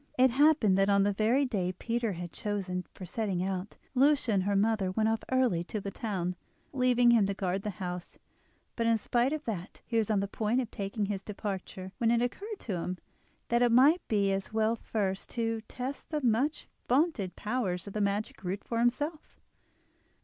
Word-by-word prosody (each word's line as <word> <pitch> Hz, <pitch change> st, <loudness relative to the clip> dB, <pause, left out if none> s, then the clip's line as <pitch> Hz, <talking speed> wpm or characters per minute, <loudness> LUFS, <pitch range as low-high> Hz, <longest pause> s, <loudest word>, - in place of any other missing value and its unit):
It 255 Hz, 0 st, +5 dB
happened 265 Hz, -8 st, +4 dB
that 195 Hz, +1 st, +3 dB
on 200 Hz, -1 st, +4 dB
the 205 Hz, 0 st, +2 dB
very 230 Hz, +7 st, +2 dB
day 190 Hz, -8 st, -1 dB
Peter 230 Hz, +2 st, -2 dB
had 175 Hz, -1 st, -7 dB
chosen 190 Hz, -3 st, -3 dB
for 185 Hz, -, -9 dB
setting 190 Hz, -1 st, -2 dB
out, 190 Hz, +1 st, -3 dB, 0.2 s
Lucia 275 Hz, -2 st, +3 dB
and 195 Hz, -3 st, +2 dB
her 200 Hz, 0 st, +1 dB
mother 205 Hz, -1 st, +2 dB
went 215 Hz, +4 st, +1 dB
off 225 Hz, 0 st, -1 dB
early 250 Hz, -10 st, +2 dB
to 215 Hz, -, -4 dB
the 200 Hz, 0 st, -5 dB
town, 185 Hz, -5 st, -3 dB, 0.4 s
leaving 250 Hz, -2 st, +4 dB
him 220 Hz, -4 st, +4 dB
to 200 Hz, -, -2 dB
guard 190 Hz, 0 st, -1 dB
the 210 Hz, -, -3 dB
house; 180 Hz, -2 st, -5 dB, 0.6 s
but 230 Hz, -1 st, 0 dB
in 230 Hz, 0 st, +4 dB
spite 240 Hz, +4 st, +1 dB
of 310 Hz, -1 st, -3 dB
that 200 Hz, -4 st, -5 dB
he 230 Hz, -2 st, +1 dB
was 220 Hz, -, 0 dB
on 210 Hz, -2 st, +2 dB
the 200 Hz, -, -1 dB
point 220 Hz, +4 st, 0 dB
of 245 Hz, -4 st, -3 dB
taking 200 Hz, +1 st, -2 dB
his 195 Hz, -1 st, -3 dB
departure 195 Hz, -2 st, -5 dB
when 230 Hz, -, +3 dB
it 235 Hz, 0 st, +4 dB
occurred 405 Hz, -, -4 dB
to 195 Hz, -6 st, -3 dB
him 180 Hz, +2 st, -3 dB, 0.5 s
that 235 Hz, +1 st, +3 dB
it 245 Hz, -1 st, +4 dB
might 285 Hz, +9 st, +6 dB
be 200 Hz, -2 st, +2 dB
as 195 Hz, 0 st, -2 dB
well 220 Hz, +1 st, +2 dB
first 200 Hz, -4 st, -2 dB
to 225 Hz, -1 st, -1 dB
test 260 Hz, +3 st, -6 dB
the 300 Hz, -3 st, -2 dB
much 250 Hz, +6 st, +1 dB, 0.2 s
vaunted 255 Hz, -, +1 dB
powers 210 Hz, -6 st, -2 dB
of 200 Hz, -, -8 dB
the 215 Hz, -, -1 dB
magic 200 Hz, 0 st, -1 dB
root 190 Hz, +2 st, -3 dB
for 230 Hz, -, -2 dB
himself. 290 Hz, +7 st, -1 dB
215 Hz, 200 wpm, -30 LUFS, 195-245 Hz, 0.6 s, might